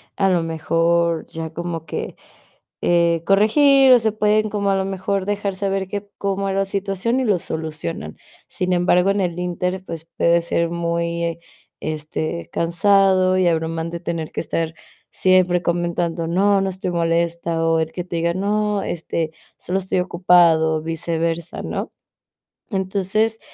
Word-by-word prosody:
a 195 Hz, -1 st, +2 dB
lo 180 Hz, -2 st, +2 dB
mejor 165 Hz, +1 st, +1 dB
ya 160 Hz, 0 st, -6 dB
como 170 Hz, -1 st, -4 dB
que, -, -, -5 dB, 0.7 s
eh, 170 Hz, -1 st, +2 dB
corregir 265 Hz, +7 st, +5 dB
o 245 Hz, -, +7 dB
se 220 Hz, -1 st, +1 dB
pueden 215 Hz, 0 st, +2 dB
como 200 Hz, -1 st, -1 dB
a -, -, +2 dB
lo 190 Hz, 0 st, 0 dB
mejor 195 Hz, 0 st, -2 dB
dejar 205 Hz, -1 st, -1 dB
saber 195 Hz, 0 st, -1 dB
que 205 Hz, 0 st, -5 dB
cómo 195 Hz, 0 st, -1 dB
era 195 Hz, 0 st, 0 dB
la 195 Hz, -, +1 dB
situación 195 Hz, +5 st, -1 dB
y 260 Hz, -, 0 dB
lo 205 Hz, -5 st, +2 dB
solucionan. 160 Hz, -, -5 dB, 0.3 s
Sin 180 Hz, 0 st, -2 dB
embargo, 180 Hz, +1 st, +3 dB
en 200 Hz, -, 0 dB
el 175 Hz, -1 st, -2 dB
inter, 180 Hz, +1 st, -2 dB
pues 165 Hz, -2 st, -7 dB
puede 170 Hz, 0 st, +3 dB
ser 170 Hz, 0 st, 0 dB
muy, 170 Hz, 0 st, -2 dB, 0.4 s
este, 155 Hz, +2 st, -4 dB
cansado 185 Hz, +1 st, +3 dB
y 185 Hz, -, +3 dB
abrumante 165 Hz, +1 st, -2 dB
tener 165 Hz, -3 st, -4 dB
que -, -, -4 dB
estar 165 Hz, -1 st, -3 dB, 0.4 s
siempre 185 Hz, -1 st, +3 dB
comentando: 170 Hz, -1 st, -1 dB
"No, 195 Hz, +3 st, +3 dB
no 195 Hz, -, 0 dB
estoy 185 Hz, -1 st, -4 dB
molesta", 170 Hz, -1 st, 0 dB
o 165 Hz, 0 st, +3 dB
él 160 Hz, 0 st, -1 dB
que 180 Hz, -, -4 dB
te 175 Hz, -, -6 dB
diga: 170 Hz, +1 st, +1 dB
"No, 210 Hz, +1 st, 0 dB
este, 165 Hz, -1 st, -3 dB, 0.3 s
solo 190 Hz, +2 st, -2 dB
estoy 185 Hz, -1 st, -1 dB
ocupado", 170 Hz, -3 st, +3 dB
viceversa, 165 Hz, +1 st, -2 dB
¿no? -, -, -4 dB, 0.8 s
Entonces, 200 Hz, +3 st, 0 dB
175 Hz, 155 wpm, -21 LUFS, 165-195 Hz, 0.8 s, o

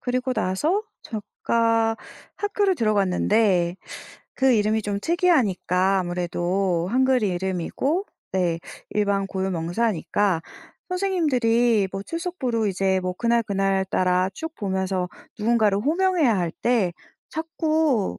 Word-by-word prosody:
그리고 255 Hz, +1 st, -1 dB
나서 300 Hz, -, 0 dB, 0.2 s
제가 225 Hz, +1 st, 0 dB, 0.4 s
학교를 410 Hz, -2 st, +1 dB
들어갔는데 200 Hz, -, +2 dB, 0.6 s
그 265 Hz, -1 st, +3 dB
이름이 215 Hz, 0 st, +2 dB
좀 200 Hz, -1 st, -2 dB
특이하니까 200 Hz, -, +2 dB
아무래도 175 Hz, 0 st, -1 dB
한글 260 Hz, 0 st, +3 dB
이름이고 190 Hz, -, -1 dB, 0.3 s
네, 175 Hz, -3 st, +1 dB, 0.3 s
일반 200 Hz, -2 st, +1 dB
고유명사니까 190 Hz, 0 st, 0 dB, 0.5 s
선생님들이 245 Hz, -, +2 dB
뭐 195 Hz, 0 st, -4 dB
출석부로 285 Hz, -, -2 dB
이제 190 Hz, -1 st, +1 dB
뭐 185 Hz, 0 st, -2 dB
그날 235 Hz, +3 st, +2 dB
그날따라 190 Hz, -2 st, +1 dB
쭉 320 Hz, 0 st, -6 dB
보면서 190 Hz, -2 st, -1 dB, 0.3 s
누군가를 215 Hz, -2 st, +2 dB
호명해야 315 Hz, -, +2 dB
할 175 Hz, -2 st, -1 dB
때 230 Hz, -7 st, +2 dB, 0.4 s
자꾸 315 Hz, -, 0 dB
210 Hz, 260 characters per minute, -24 LUFS, 190-260 Hz, 0.6 s, 그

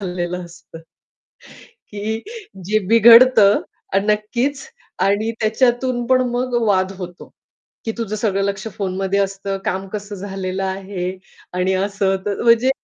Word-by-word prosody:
चालेलं 180 Hz, -1 st, -3 dB
असतं. 165 Hz, -1 st, -13 dB, 1.1 s
की 215 Hz, +2 st, -4 dB, 0.4 s
जे 215 Hz, +3 st, +2 dB
बिघडतं 230 Hz, -2 st, +7 dB, 0.3 s
आणि 195 Hz, +2 st, +1 dB
नक्कीच 245 Hz, -, -2 dB, 0.3 s
आणि 205 Hz, +3 st, +1 dB
त्याच्यातून 240 Hz, +2 st, +1 dB
पण 255 Hz, 0 st, +4 dB
मग 245 Hz, +1 st, -2 dB
वाद 190 Hz, -2 st, +2 dB
होतो. 180 Hz, -1 st, -9 dB, 0.5 s
की 225 Hz, -, -2 dB
"तुझं 215 Hz, -2 st, -3 dB
सगळं 200 Hz, -2 st, 0 dB
लक्ष 200 Hz, +1 st, -3 dB
फोनमध्ये 195 Hz, 0 st, -1 dB
असतं, 195 Hz, 0 st, -2 dB
काम 190 Hz, +1 st, -2 dB
कसं 205 Hz, 0 st, -5 dB
झालेलं 190 Hz, -1 st, -4 dB
आहे 190 Hz, -1 st, -4 dB, 0.4 s
आणि 180 Hz, +1 st, +1 dB
असं-तसं." 195 Hz, 0 st, -1 dB
म्हणजे 235 Hz, +2 st, +5 dB
200 Hz, 120 wpm, -19 LUFS, 190-225 Hz, 1.1 s, बिघडतं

